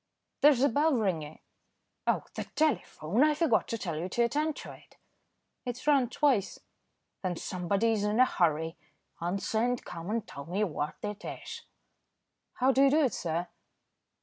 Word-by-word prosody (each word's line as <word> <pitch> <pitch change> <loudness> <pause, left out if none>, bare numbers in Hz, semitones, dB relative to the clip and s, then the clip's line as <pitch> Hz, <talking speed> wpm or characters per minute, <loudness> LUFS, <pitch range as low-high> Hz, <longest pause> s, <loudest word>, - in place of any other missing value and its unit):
"There's 280 -3 +6
a 280 - +5
bell 295 +4 +3
ringing." 165 -9 -2 0.7
"Oh! - - +2
the - - -4
telephone. 250 - +1
I 305 0 +4
forgot 300 -8 +2
to 230 - -2
tell 170 -7 -3
you 180 +3 -3
to 235 - +1
attend 295 +6 0
to - - -8
it." - - -17 0.7
"It's 245 +1 -5
rung 275 -5 +4
twice." 255 -7 +1 0.6
"Then 185 -2 -1
somebody 195 +6 0
is 215 -2 0
in 210 +3 +1
a 255 - +8
hurry. 160 -5 0 0.4
Answer 195 +5 -1
and 245 +1 0
come 170 +1 -7
and 225 0 -1
tell 140 - -8
me 190 +5 0
what 150 -6 -2
it 210 -1 -5
is." - - -7 0.9
"How 260 +2 +3
do 270 - +3
you - - +6
do 305 +3 +4
it, 260 - +1
sir?" 170 +1 -2
220 Hz, 170 wpm, -30 LUFS, 175-265 Hz, 0.9 s, a